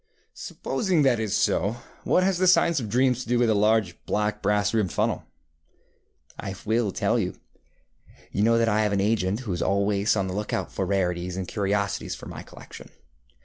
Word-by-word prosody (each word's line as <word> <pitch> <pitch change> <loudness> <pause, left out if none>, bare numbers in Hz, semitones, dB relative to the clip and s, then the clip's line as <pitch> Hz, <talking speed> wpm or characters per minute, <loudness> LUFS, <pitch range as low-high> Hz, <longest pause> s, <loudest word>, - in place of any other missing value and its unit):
ŌĆØ - - -8
ŌĆ£Supposing 185 -8 0
that 125 -4 +3
is 110 -3 0
so, 100 +6 +1 0.3
what 185 - +3
has 190 -2 +1
the 185 - +3
science 170 -3 +4
of 115 -4 -5
dreams 125 +2 +2
to 120 - -8
do 125 - +2
with 120 -2 +3
a - - +4
large 105 -3 +1
black 105 0 -1
brass 105 +1 +1
rimmed 105 -6 +1
funnel? - - -1 1.2
ŌĆØ - - -5
ŌĆ£I 95 - -14
will 110 -1 +1
tell - - 0
you. - - -2 1.0
You 100 - -1
know 115 +2 +4
that 115 0 +2
I 110 0 +2
have 105 -1 +1
an 100 - +1
agent 105 +1 0
who 110 -8 -4
is 85 - -3
always 100 +2 +1
on 100 -2 0
the 95 - -4
lookout 105 +2 -3
for 95 - -2
rarities 90 -2 -1
and 95 -1 -4
curiosities 100 -1 -1
for - - -11
my - - -8
collection. - - -12
105 Hz, 200 wpm, -25 LUFS, 100-115 Hz, 1.2 s, science